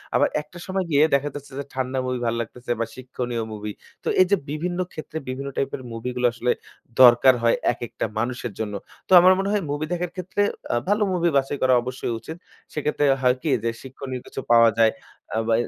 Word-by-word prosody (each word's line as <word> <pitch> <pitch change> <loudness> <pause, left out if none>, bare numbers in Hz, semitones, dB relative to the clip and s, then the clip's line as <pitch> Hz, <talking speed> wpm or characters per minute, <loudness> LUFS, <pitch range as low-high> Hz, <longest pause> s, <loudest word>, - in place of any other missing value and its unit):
আবার - - +4
একটা 150 +4 -15
সময় 190 0 -1
গিয়ে 145 0 +5
দেখা 140 +1 0
যাচ্ছে 145 -1 -8
যে - - -2
ঠান্ডা 130 0 -2
movie 125 -1 -2
ভালো 115 0 0
লাগতেসে 120 +2 -4
বা 115 - +1
শিক্ষণীয় 125 -2 -4
movie. 105 0 -5 0.3
তো - - -6
এই - - +7
যে - - +7
বিভিন্ন 175 +4 -3
ক্ষেত্রে 155 0 -7
বিভিন্ন 135 +2 -4
type 135 - 0
এর - - -11
movie 115 +2 -4
গুলো 125 0 +3
আসলে 120 +1 0 0.5
দরকার 125 +1 +8
হয় 115 - +4 0.2
একেকটা 120 0 -4
মানুষের 120 0 -2
জন্য। 105 -2 -3 0.3
তো - - -15
আমার 185 +2 +7
মনে 195 +1 0
হয় 210 - +2
movie 150 +2 -2
দেখার 175 0 -2
ক্ষেত্রে 185 +2 -2 0.3
আ - - +2
ভালো 210 +1 +3
movie 170 -1 +2
বাছাই 135 +1 0
করা 130 0 +4
অবশ্যই 125 -1 -4
উচিত। 160 +1 -8 0.4
সেক্ষেত্রে 145 0 +1 0.2
হয় 125 -1 +4
কি? 160 - 0
যে 115 - +1
শিক্ষণীয় 130 -1 -7
কিছু - - -6
পাওয়া 115 -1 +7
যায় 115 -1 +5 0.4
আ - - +1
বা 115 - +3
130 Hz, 205 wpm, -24 LUFS, 120-155 Hz, 0.5 s, দরকার